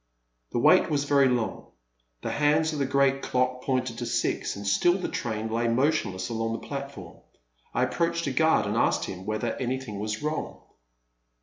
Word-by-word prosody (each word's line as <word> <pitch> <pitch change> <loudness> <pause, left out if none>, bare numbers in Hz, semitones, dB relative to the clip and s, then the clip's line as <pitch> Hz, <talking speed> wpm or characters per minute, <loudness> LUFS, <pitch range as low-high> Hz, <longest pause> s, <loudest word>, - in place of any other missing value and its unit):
The - - -2
wait - - +5
was 145 -2 +1
very 140 -2 +4
long; 120 -3 -2 0.6
the - - -2
hands 155 +2 +2
of 150 - -3
the 140 - +1
great 135 0 +2
clock 125 0 0
pointed 130 -3 -1
to 120 - -3
six, - - -1
and 100 0 -7
still 175 - +3
the 185 - -3
train 110 -2 -3
lay 115 +1 0
motionless 115 -7 0
along 115 0 -2
the 115 - -6
platform. 140 0 -7 0.5
I - - +1
approached 170 0 0
a 140 - -1
guard, 160 +4 +3
and - - -2
asked - - +2
him 95 +1 -7
whether 110 +2 -1
anything 130 -5 -3
was 110 +5 -3
wrong. 155 +1 -3
130 Hz, 180 wpm, -27 LUFS, 115-145 Hz, 0.6 s, wait